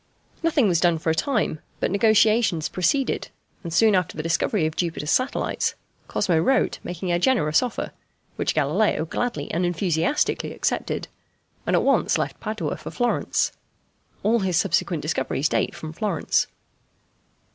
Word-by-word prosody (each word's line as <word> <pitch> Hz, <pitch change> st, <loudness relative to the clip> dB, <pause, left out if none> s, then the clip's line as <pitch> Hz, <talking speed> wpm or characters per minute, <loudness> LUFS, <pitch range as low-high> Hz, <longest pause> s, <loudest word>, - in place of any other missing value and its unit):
Nothing 310 Hz, -8 st, +3 dB
was 175 Hz, -4 st, +2 dB
done 170 Hz, -1 st, +3 dB
for 160 Hz, 0 st, 0 dB
a -, -, +2 dB
time, 215 Hz, -, 0 dB, 0.2 s
but -, -, 0 dB
negotiations 215 Hz, -4 st, +3 dB
proceeded, 250 Hz, -, 0 dB, 0.3 s
and 170 Hz, -, -6 dB
soon 215 Hz, +6 st, +4 dB
after 180 Hz, -5 st, 0 dB
the 155 Hz, -, -3 dB
discovery 165 Hz, +2 st, +1 dB
of 155 Hz, 0 st, -2 dB
Jupiter's 165 Hz, -3 st, -2 dB
satellites 255 Hz, +2 st, 0 dB, 0.3 s
Cosmo 175 Hz, -5 st, +1 dB
wrote 260 Hz, +11 st, +2 dB
making 180 Hz, +1 st, -4 dB
a 175 Hz, -, +2 dB
generous 175 Hz, -9 st, +3 dB
offer, 250 Hz, -, -3 dB, 0.4 s
which -, -, -1 dB
Galileo 210 Hz, -7 st, +1 dB
gladly 165 Hz, -5 st, -3 dB
and 170 Hz, +3 st, 0 dB
enthusiastically 175 Hz, -, 0 dB
accepted, -, -, -2 dB, 0.6 s
and -, -, +3 dB
at -, -, +3 dB
once -, -, +3 dB
left -, -, -3 dB
Padua 215 Hz, 0 st, -3 dB
for -, -, -8 dB
Florence. 245 Hz, -1 st, 0 dB, 0.7 s
All 230 Hz, +2 st, +3 dB
his 185 Hz, -4 st, 0 dB
subsequent 165 Hz, 0 st, +1 dB
discoveries 145 Hz, -1 st, 0 dB
date -, -, 0 dB
from 155 Hz, 0 st, -7 dB
Florence. 195 Hz, -3 st, 0 dB
180 Hz, 145 wpm, -24 LUFS, 160-220 Hz, 0.7 s, soon